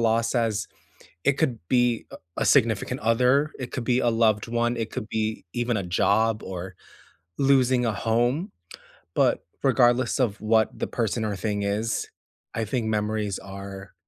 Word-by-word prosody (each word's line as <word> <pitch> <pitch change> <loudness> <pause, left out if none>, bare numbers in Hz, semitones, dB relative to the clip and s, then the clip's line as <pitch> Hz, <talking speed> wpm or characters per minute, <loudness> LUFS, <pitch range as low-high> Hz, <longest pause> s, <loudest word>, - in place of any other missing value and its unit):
loss 115 +1 +1
as 115 -3 0 0.6
it 140 - +4
could 135 -5 0
be 120 -2 +2
a - - -8 0.2
a - - 0
significant - - +2
other, 125 +7 +3
it 125 -2 -5
could 125 - -3
be 125 +1 +2
a 120 - +2
loved 110 -2 +2
one, 120 +1 0
it 115 -2 -3
could 105 - -5
be 110 -3 -2
even 120 -2 0
a 100 - -2
job 105 +5 +2
or 95 0 -6 0.6
losing 130 -2 +3
a 115 - +1
home. 120 - 0 0.7
But - - +2 0.2
regardless 125 -1 +3
of 115 -5 0
what 110 0 +2
the - - -2
person 115 -1 -1
or 105 -2 -2
thing 105 +2 -2
is, 105 +3 -1 0.5
I 115 - -1
think 115 +1 -2
memories 105 -2 -1
are 100 0 -9
115 Hz, 160 wpm, -25 LUFS, 105-120 Hz, 0.7 s, it